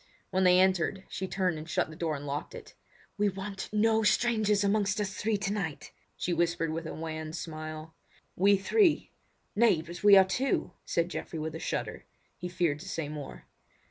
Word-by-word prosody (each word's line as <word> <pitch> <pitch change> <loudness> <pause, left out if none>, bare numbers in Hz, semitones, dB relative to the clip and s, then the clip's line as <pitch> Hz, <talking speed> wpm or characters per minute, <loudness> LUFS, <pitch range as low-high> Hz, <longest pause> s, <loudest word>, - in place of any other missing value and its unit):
When 190 0 +2
they 180 0 +6
entered, 190 0 +2
she 190 - -4
turned 180 -4 -1
and 155 +2 -9
shut 160 - 0
the - - -10
door 160 -1 -1
and 145 0 -7
locked 145 - -4
it. 445 -3 -11 0.5
"We 205 0 +3
want 195 0 -6
no 220 +1 +3
strangers 215 -1 +2
amongst 205 0 +1
us 200 -2 -2
three 220 0 0
tonight!" 200 -6 -3 0.3
she 175 - -1
whispered 165 -1 0
with 165 0 -4
a - - -5
wan 160 -1 -5
smile. 155 -1 -6 0.4
"We 200 +2 +5
three! 350 - +2 0.4
nay 205 -7 +4 0.2
we 205 -1 +8
are 190 - +9
but 190 - -9
two," 265 +7 0
said 170 +1 0
Geoffrey 165 - -5
with 155 0 -3
a 160 - -5
shudder; - - -4 0.3
he 180 - -6
feared 170 -5 0
to - - -8
say 160 -3 -3
more. 150 -2 -8
185 Hz, 185 wpm, -30 LUFS, 160-205 Hz, 0.5 s, are